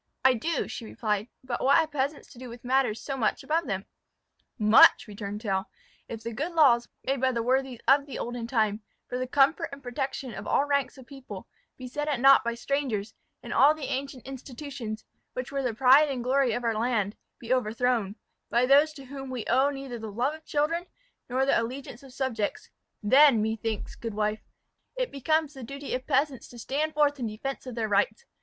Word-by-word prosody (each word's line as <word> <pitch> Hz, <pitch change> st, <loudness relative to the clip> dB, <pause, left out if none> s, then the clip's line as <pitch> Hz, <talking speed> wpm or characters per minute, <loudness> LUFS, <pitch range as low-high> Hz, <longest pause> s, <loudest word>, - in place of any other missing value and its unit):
"I 260 Hz, -, +7 dB
do," 320 Hz, +8 st, -1 dB
she -, -, -6 dB
replied; 215 Hz, -1 st, -2 dB, 0.2 s
"but 255 Hz, -2 st, -3 dB
what 275 Hz, -, +6 dB
have 320 Hz, -1 st, +1 dB
peasants 285 Hz, +1 st, -2 dB
to 240 Hz, -, -14 dB
do 255 Hz, -1 st, -8 dB
with 235 Hz, +1 st, -11 dB
matters 250 Hz, -4 st, +1 dB
so 275 Hz, -, -4 dB
much 225 Hz, -5 st, 0 dB
above 325 Hz, +2 st, 0 dB
them?" 195 Hz, 0 st, -3 dB, 0.7 s
"Much!" 215 Hz, -1 st, +7 dB
returned 205 Hz, 0 st, -6 dB
Tell. 195 Hz, -2 st, -1 dB, 0.4 s
"If 225 Hz, -1 st, -7 dB
the 230 Hz, -, -4 dB
good 300 Hz, +10 st, -3 dB
laws 250 Hz, -7 st, +4 dB
made 270 Hz, -1 st, -1 dB
by 260 Hz, 0 st, +3 dB
the 235 Hz, -2 st, -1 dB
worthies 260 Hz, 0 st, 0 dB
of 280 Hz, +1 st, +5 dB
the 275 Hz, -, -6 dB
olden 240 Hz, -1 st, -4 dB
time, 220 Hz, -3 st, +1 dB, 0.3 s
for 250 Hz, -, -3 dB
the 255 Hz, -, -2 dB
comfort 285 Hz, +6 st, +3 dB
and 280 Hz, 0 st, -10 dB
protection 255 Hz, 0 st, -4 dB
of -, -, -7 dB
all 280 Hz, -, +2 dB
ranks 280 Hz, -1 st, 0 dB
of 260 Hz, -, -12 dB
people, 255 Hz, -8 st, -10 dB, 0.3 s
be 255 Hz, -, -7 dB
set 295 Hz, +4 st, -4 dB
at 285 Hz, -5 st, 0 dB
naught 270 Hz, +2 st, +7 dB
by 235 Hz, 0 st, -2 dB
strangers, 235 Hz, -5 st, -2 dB, 0.3 s
and -, -, -5 dB
all 295 Hz, +3 st, +6 dB
the 305 Hz, -3 st, -4 dB
ancient 270 Hz, -1 st, -5 dB
institutions, 260 Hz, -3 st, -7 dB, 0.3 s
which 255 Hz, +1 st, -5 dB
were 275 Hz, 0 st, -1 dB
the 250 Hz, -3 st, 0 dB
pride 265 Hz, +6 st, +6 dB
and 260 Hz, -3 st, -3 dB
the -, -, -5 dB
glory 260 Hz, -1 st, +2 dB
of 245 Hz, -, -3 dB
our 230 Hz, -1 st, +1 dB
land, 215 Hz, -2 st, 0 dB, 0.2 s
be 240 Hz, +1 st, -1 dB
overthrown, 235 Hz, -3 st, 0 dB, 0.3 s
by 240 Hz, +1 st, +3 dB
those 290 Hz, +4 st, +5 dB
to 275 Hz, -3 st, -11 dB
whom 270 Hz, 0 st, -8 dB
we 250 Hz, -3 st, -4 dB
owe 265 Hz, +4 st, +3 dB
neither 270 Hz, -4 st, -6 dB
the 220 Hz, -1 st, -6 dB
love 245 Hz, +8 st, 0 dB
of 315 Hz, 0 st, -11 dB
children, 330 Hz, +4 st, 0 dB, 0.4 s
nor 260 Hz, +2 st, +1 dB
the 275 Hz, -, +3 dB
allegiance 245 Hz, 0 st, -6 dB
of 270 Hz, -2 st, -14 dB
subjects, 250 Hz, -6 st, -3 dB, 0.3 s
then, 265 Hz, +2 st, +6 dB
methinks, 220 Hz, 0 st, -2 dB
good 230 Hz, -3 st, -6 dB
wife, 210 Hz, 0 st, -1 dB, 0.6 s
it -, -, -1 dB
becomes 305 Hz, +2 st, 0 dB
the 265 Hz, -, -10 dB
duty 275 Hz, +4 st, -6 dB
of 255 Hz, +1 st, -3 dB
peasants 275 Hz, -1 st, 0 dB
to 245 Hz, -, -13 dB
stand 295 Hz, +6 st, -2 dB
forth 290 Hz, -1 st, +2 dB
in 240 Hz, -, -2 dB
defence 260 Hz, +5 st, -5 dB
of 250 Hz, -, -6 dB
their 225 Hz, -2 st, -1 dB
rights. 475 Hz, -, +1 dB
255 Hz, 205 wpm, -27 LUFS, 230-280 Hz, 0.7 s, I